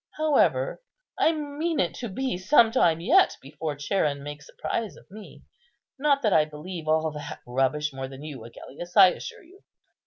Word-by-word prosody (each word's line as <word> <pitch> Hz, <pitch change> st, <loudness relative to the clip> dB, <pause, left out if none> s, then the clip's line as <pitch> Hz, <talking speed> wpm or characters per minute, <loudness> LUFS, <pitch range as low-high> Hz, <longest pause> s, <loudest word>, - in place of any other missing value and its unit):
However, 310 Hz, -, +2 dB, 0.4 s
I 320 Hz, -, +4 dB
mean 310 Hz, +1 st, -3 dB
it 175 Hz, -, +1 dB
to 240 Hz, -, -5 dB
be 260 Hz, +3 st, -2 dB
some 225 Hz, +5 st, +4 dB
time 165 Hz, -6 st, +3 dB
yet 350 Hz, -, +4 dB
before 145 Hz, +2 st, -5 dB
Charon 145 Hz, -1 st, -1 dB
makes 145 Hz, 0 st, -9 dB
a -, -, -17 dB
prize 225 Hz, -3 st, -3 dB
of -, -, -17 dB
me; 210 Hz, 0 st, -12 dB, 0.6 s
not 280 Hz, -1 st, +2 dB
that 210 Hz, -4 st, +3 dB
I 155 Hz, -, +6 dB
believe 155 Hz, +2 st, -8 dB
all 160 Hz, 0 st, +2 dB
that 150 Hz, -1 st, -8 dB
rubbish 135 Hz, +4 st, 0 dB
more 135 Hz, 0 st, -5 dB
than 135 Hz, +2 st, -11 dB
you, 145 Hz, -6 st, -8 dB
Agellius, 160 Hz, -, -9 dB
I 190 Hz, -2 st, +10 dB
assure 445 Hz, -, -7 dB
you." 375 Hz, +4 st, -19 dB
175 Hz, 180 wpm, -26 LUFS, -, 0.6 s, I